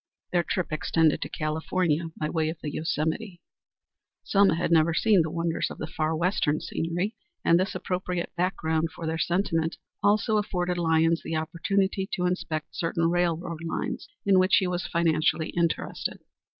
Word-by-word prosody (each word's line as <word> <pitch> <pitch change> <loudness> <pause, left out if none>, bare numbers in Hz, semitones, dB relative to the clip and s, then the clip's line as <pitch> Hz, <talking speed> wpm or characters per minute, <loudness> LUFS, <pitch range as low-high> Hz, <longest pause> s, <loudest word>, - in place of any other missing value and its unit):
Their 175 - +3
trip 175 0 -2
extended 155 0 +2
to - - -3
California 160 +1 0
by 150 - 0
way 155 0 0
of 160 - -5
the 150 - -4
Yosemite. 160 +5 -2 0.8
Selma 200 -3 +4
had 170 0 -1
never 160 0 +4
seen 205 -1 +4
the 160 - -1
wonders 170 0 -1
of - - -8
the - - -4
far 160 -1 -1
western 165 -3 +1
scenery, 170 +5 -2 0.3
and 170 - +5
this 190 +1 -1
appropriate 180 -1 -3
background 165 -3 0
for 165 - -6
their 160 0 -2
sentiment 170 -2 0 0.2
also 210 +2 +3
afforded 180 -4 -1
Lyons 165 0 +3
the 165 - -4
opportunity 190 +5 0
to 180 - 0
inspect 170 -4 -2
certain 165 0 0
railroad 170 -1 -1
lines 165 - -3 0.2
in 195 -2 +5
which 185 +1 +4
he 190 - +3
was 180 0 -2
financially 160 -1 +1
interested. 170 -1 -1
170 Hz, 160 wpm, -27 LUFS, 160-180 Hz, 0.8 s, and